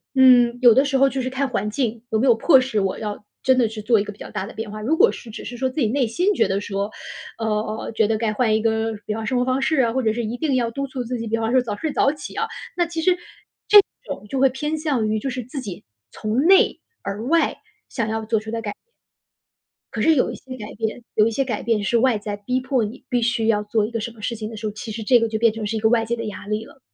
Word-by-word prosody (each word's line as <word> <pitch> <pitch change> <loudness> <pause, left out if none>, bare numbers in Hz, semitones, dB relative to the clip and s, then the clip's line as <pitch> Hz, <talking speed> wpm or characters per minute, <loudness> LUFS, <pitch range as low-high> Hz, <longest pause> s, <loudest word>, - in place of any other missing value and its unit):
嗯， 245 -2 +6
有 240 -3 +8
的 265 +2 +5
时 275 -1 +1
候 275 0 +5
就 270 - -2
是 255 - -2
看 265 +1 -1
环 210 -4 -1
境， 235 -2 -2
有 220 - +2
没 260 - +2
有 240 - +6
迫 265 +3 +5
使 255 -5 -1
我 195 -1 -1
要 210 -1 -5 0.2
真 260 -1 +3
的 240 -3 +4
去 215 0 -7
做 225 +1 +3
一 200 - 0
个 210 - -7
比 200 - -24
较 - - -8
大 200 -2 -4
的 225 - -10
变 220 -1 -6
化。 215 - -6
如 255 +10 +1
果 450 +7 +5
是 230 - -10
只 - - -8
是 245 - -7
说 260 +1 0
自 275 +3 -3
己 225 - +3
内 260 +3 +1
心 355 - +1
觉 - - +3
得 195 +1 -1
说， 200 +1 -3 0.5
呃， 215 0 -2
觉 220 - +3
得 220 - +1
该 220 -1 0
换 220 0 +2
一 220 - +1
个， 220 0 0
比 210 - -1
方 225 - -4
生 250 +3 0
活 250 - +1
方 260 +1 +1
式 305 +4 +1
啊， 235 - +2
或 260 0 0
者 220 - +2
是 235 +1 -2
一 230 +3 -3
定 300 -2 0
要 240 -2 +1
督 275 +4 -3
促 260 -2 -5
自 245 +1 -4
己， 230 - -5
比 225 - 0
方 225 +1 -1
说 255 - +4
早 220 -4 -4
睡 310 +8 -3
早 275 - +3
起 300 - -9
啊， 450 - -1 0.3
那 350 - +3
其 330 -1 -4
实 360 +1 +3 0.5
这 420 - +9 0.3
种 210 - -7
就 270 - -2
会 270 0 +5
偏 295 +5 -3
向 285 -8 0
于 215 - 0
就 265 +4 -3
是 250 - -3
自 255 +4 -7
己 195 -8 -7 0.3
从 220 +4 -1
内 380 +3 +5 0.2
而 200 +3 -5
外 330 +5 +2 0.3
想 230 -4 -2
要 220 0 -2
做 220 0 0
出 220 +1 -8
的 230 - -3
改 210 -2 -4
变。 - - -16 1.1
可 - - -2
是 320 -1 +4
有 250 - +2
一 - - -6
些 255 -1 -10
改 210 -2 -8
变 225 +2 -3
有 215 0 +4
一 230 - -1
些 270 +4 0
改 225 -5 -3
变 225 -3 0
是 235 +3 +2
外 250 -2 +3
在 205 0 -5
逼 250 +6 -2
迫 260 -2 0
你 215 +4 -6
必 245 -2 +1
须 235 -1 +1
要 210 -2 +3
做 210 0 0
一 215 - -6
个 230 -1 -3
什 235 - -4
么 225 -2 -15
事 235 - -2
情 215 -1 -5
的 225 - -8
时 215 - -6
候， 210 - -1
其 215 +2 -7
实 220 +1 -5
这 245 +3 +5
个 230 0 0
就 220 - -1
变 230 -1 +3
成 220 -1 -4
是 220 +1 -2
一 - - -2
个 220 - +3
外 230 0 +3
界 235 +1 -2
的 230 - -5
压 205 -1 -7
力 215 +1 -2
了。 - - -17
230 Hz, 325 characters per minute, -22 LUFS, 215-260 Hz, 1.1 s, 这